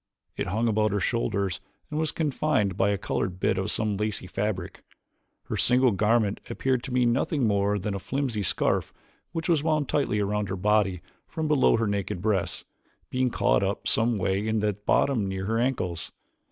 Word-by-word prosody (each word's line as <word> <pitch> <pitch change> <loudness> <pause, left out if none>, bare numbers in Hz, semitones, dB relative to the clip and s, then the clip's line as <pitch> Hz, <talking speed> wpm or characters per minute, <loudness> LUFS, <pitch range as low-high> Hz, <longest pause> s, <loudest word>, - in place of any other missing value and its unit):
It - - -3
hung 110 +6 0
about 110 -1 +2
her 100 - 0
shoulders 100 -3 -1 0.3
and 150 - -1
was 155 -1 0
confined 140 - 0
by 100 +1 +2
a 100 - +1
colored 95 -1 -2
bit - - +1
of 95 +2 -2
some 105 -2 0
lacy 105 -2 -2
fabric. 95 -1 -3 0.6
Her - - -4
single 125 0 +4
garment 105 +1 +2
appeared 130 -2 0
to 135 - -6
be 125 0 +2
nothing 130 +3 +1
more 100 -1 +2
than 100 +1 -3
a 100 - -3
filmy 130 -1 -2
scarf 95 - 0 0.4
which 165 -1 -3
was 165 -4 +3
wound 155 -3 0
tightly 125 -8 +1
around 105 -1 -1
her 95 - -2
body 100 -2 +1 0.3
from 160 -1 -3
below 150 -6 +4
her 115 - +1
naked 100 -3 -2
breasts, 100 -2 -1 0.5
being 130 0 +1
caught 100 -3 +2
up 100 +1 -2
some 115 0 +2
way 100 +2 0
at 110 0 +1
the 105 0 +1
bottom 105 +3 +1
near 95 0 -3
her 115 +2 0
ankles. 95 -10 -1
105 Hz, 185 wpm, -26 LUFS, 100-125 Hz, 0.6 s, single